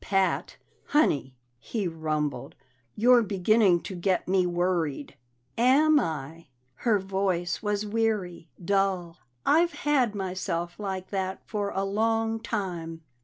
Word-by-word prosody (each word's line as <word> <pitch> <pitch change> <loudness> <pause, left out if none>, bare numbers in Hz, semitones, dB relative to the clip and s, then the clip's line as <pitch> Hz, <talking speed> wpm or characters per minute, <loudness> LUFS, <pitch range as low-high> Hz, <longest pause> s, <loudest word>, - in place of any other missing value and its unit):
"Pat, 195 -1 0 0.3
Honey," 140 - +1 0.2
he 205 - -3
rumbled, 155 -5 -3 0.4
"you're 245 +2 +5
beginning 200 -2 +3
to - - -6
get 180 +1 0
me 185 -1 +2
worried!" 175 -5 -1 0.4
"Am 295 +5 +5
I?" 160 - -4 0.3
Her 225 - +1
voice 190 -2 -1
was 210 0 -1
weary, 205 -6 -1 0.2
dull. 190 -3 0 0.3
"I've 335 +3 +4
had 260 -7 +2
myself 180 -2 -3
like 190 -2 -4
that 190 -1 -3
for 205 -2 -2
a 195 -1 -2
long 225 +2 0
time." 175 -8 -4
190 Hz, 120 wpm, -27 LUFS, 175-220 Hz, 0.4 s, you're